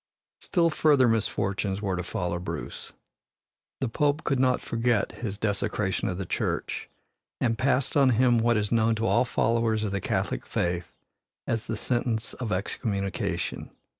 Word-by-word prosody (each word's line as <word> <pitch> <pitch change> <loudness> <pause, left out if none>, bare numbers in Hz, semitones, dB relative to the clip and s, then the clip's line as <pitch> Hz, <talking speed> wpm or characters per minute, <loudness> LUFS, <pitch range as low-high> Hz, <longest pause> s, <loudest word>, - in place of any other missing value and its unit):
Still 170 -3 +2
further 145 -4 +4
misfortunes 100 -3 0
were 100 -3 -1
to 90 - -2
follow 90 -1 -2
Bruce. 90 - -6 0.9
The 130 - +1
Pope 145 +5 +1
could 135 -2 +1
not 130 -1 +3
forget 115 -2 0
his 105 -4 -5
desecration 100 -2 -1
of 90 - -3
the 95 - -3
church - - -2 0.5
and 115 -1 +1
passed 130 +1 +1
on 140 -3 +5
him 120 0 +4
what 120 0 +3
is 105 -1 -1
known 115 -1 +3
to 110 +1 -1
all 120 +2 +3
followers 115 -2 +1
of 105 - -1
the 100 0 -2
Catholic - - -2
faith 85 -1 -1 0.5
as 115 -1 -2
the 115 - -2
sentence 120 -1 -1
of 120 -4 -5
excommunication. 100 +1 -2
115 Hz, 155 wpm, -27 LUFS, 100-125 Hz, 0.9 s, on